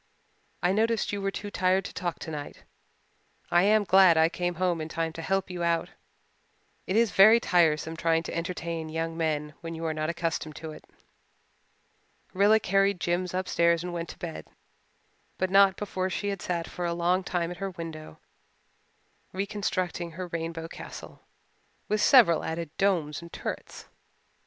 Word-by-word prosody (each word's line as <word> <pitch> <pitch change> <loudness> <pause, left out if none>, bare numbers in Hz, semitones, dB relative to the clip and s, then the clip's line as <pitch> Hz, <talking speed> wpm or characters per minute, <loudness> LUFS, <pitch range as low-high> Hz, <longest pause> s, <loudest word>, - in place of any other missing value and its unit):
"I 180 - +3
noticed 220 +1 +1
you 200 - -2
were 195 - 0
too 205 +1 -6
tired 185 0 +1
to - - -7
talk 175 -2 -3
tonight. 150 -3 -7 0.9
I 175 - +5
am 210 +2 +4
glad 190 -3 +6
I 160 0 +5
came 175 0 -2
home 175 -1 0
in 155 - -5
time 165 0 -2
to 165 - -7
help 195 +2 -1
you 175 -1 -5
out. 170 -1 0 1.0
It 190 - -1
is 230 -2 +3
very 215 +5 +7
tiresome 165 -5 +2
trying 165 0 +1
to - - -6
entertain 170 -1 -4
young 165 +1 -3
men 155 -2 -1
when 165 -1 -6
you 165 +1 -5
are 160 - 0
not 155 0 -2
accustomed 165 -2 -3
to 160 -1 -7
it." - - -12 1.5
Rilla 205 +3 +5
carried 195 -1 +2
Jims 175 +1 -1
upstairs 170 -2 +2
and 180 -1 -5
went 170 -1 -4
to - - -9
bed, 170 -2 -7 0.9
but 185 0 -1
not 195 -1 +6
before 190 -2 -2
she 205 +2 -2
had 195 -3 -4
sat 170 -2 -2
for 180 - -6
a 170 0 -1
long 175 +2 +1
time 175 -2 -2
at 180 - -7
her 195 +2 -3
window 165 - -8 1.2
reconstructing 185 -3 -2
her 185 +3 -5
rainbow 165 0 -4
castle, - - -10 0.7
with 215 0 0
several 215 - +6
added 160 -1 -4
domes 170 -7 +1
and 170 0 -11
turrets. - - -6
175 Hz, 165 wpm, -27 LUFS, 165-190 Hz, 1.5 s, very